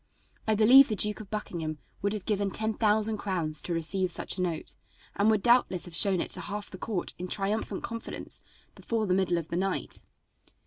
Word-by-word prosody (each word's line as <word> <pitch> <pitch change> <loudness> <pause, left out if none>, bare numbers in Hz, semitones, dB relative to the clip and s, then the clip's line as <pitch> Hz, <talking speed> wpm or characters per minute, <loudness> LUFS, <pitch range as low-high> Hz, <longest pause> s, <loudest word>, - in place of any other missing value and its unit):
I 220 - +3
believe 250 +6 +8
the 215 - -1
Duke 210 +1 +2
of 210 -3 -9
Buckingham 165 -7 -4 0.2
would 200 +1 +1
have 205 -3 -5
given 200 -2 0
ten 220 +3 -1
thousand 215 0 +2
crowns 165 -6 -1
to - - -5
receive 180 +3 0
such 170 - -2
a 185 - -3
note, 170 -3 -3 0.4
and 200 +2 +3
would 215 -3 +2
doubtless 235 -7 +3
have 175 - -10
shown 195 -1 +2
it - - -3
to - - +2
half 205 0 -6
the 185 - -9
court 205 -6 -3
in 180 - -4
triumphant 205 +3 -1
confidence 230 -1 -5 0.3
before 225 -2 -2
the 185 - +1
middle 185 -2 +2
of 165 -1 -4
the 170 - -2
night. 195 +1 -1
200 Hz, 205 wpm, -29 LUFS, 180-215 Hz, 0.4 s, believe